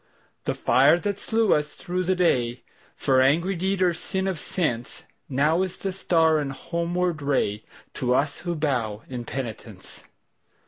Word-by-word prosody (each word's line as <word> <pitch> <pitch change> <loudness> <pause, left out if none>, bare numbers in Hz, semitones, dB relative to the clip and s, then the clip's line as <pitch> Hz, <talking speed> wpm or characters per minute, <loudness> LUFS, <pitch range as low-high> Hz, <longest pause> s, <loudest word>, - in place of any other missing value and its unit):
The - - -1
fire 140 +6 +4
that 200 +2 -3
slew 225 -2 +2
us 150 0 -1
through 180 0 -3
the 185 +1 +2
dayFor 130 -3 0
angry 170 +8 +2
deed 190 +1 0
or 180 -1 +3
sin 190 +3 -3
of 190 -3 -1
senseNow 150 +2 -1
is 185 -1 -5
the 195 - -3
star 165 -4 +2
and 140 -2 -2
homeward 170 +3 -2
rayTo 125 -3 -2
us 145 +2 0
who 175 -1 -3
bow 120 -9 -1
in 125 -2 -6
penitence. 115 -7 -7
160 Hz, 140 wpm, -25 LUFS, 130-180 Hz, -, fire